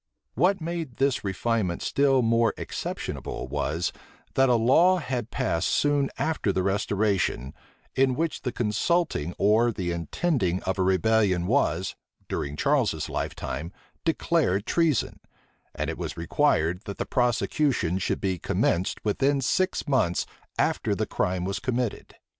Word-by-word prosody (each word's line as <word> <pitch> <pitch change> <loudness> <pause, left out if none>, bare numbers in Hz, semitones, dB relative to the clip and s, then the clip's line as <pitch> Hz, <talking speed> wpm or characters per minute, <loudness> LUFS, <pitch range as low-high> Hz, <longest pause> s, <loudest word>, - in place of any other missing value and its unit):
What 180 - +2
made 165 -6 -4
this 135 0 +1
refinement 100 -2 -1
still 135 -2 +3
more 115 0 +2
exceptionable, - - -5
was, 75 +5 -1 0.4
that 135 0 +4
a 125 - +5
law 160 +11 +5
had 125 -7 -3
passed 100 -10 0
soon 145 -1 +2
after 155 -8 0
the 95 -1 0
restoration, 95 - 0 0.4
in 130 -1 +3
which 165 +1 -2
the 125 - -2
consulting 110 - 0
or 110 +4 +4
the 90 -5 -3
intending 90 - -1
of 95 0 -2
a - - +3
rebellion 95 0 +2
was, 95 - +1 0.3
during 70 +1 -3
Charles's 120 - +1
lifetime, 80 +7 -4 0.3
declared 155 - +1
treason; 160 -2 +1 0.6
and - - -2
it - - -4
was - - -4
required, 85 +1 +1
that 100 -2 -6
the - - -2
prosecution 120 - +1
should - - -1
be 95 -2 -1
commenced 90 +6 0
within 135 +7 +2
six 185 +7 0
months 115 -11 +1 0.3
after - - +1
the - - -1
crime 90 0 -1
was 100 +1 -2
committed. 125 -3 -3
110 Hz, 135 wpm, -26 LUFS, 90-135 Hz, 0.6 s, a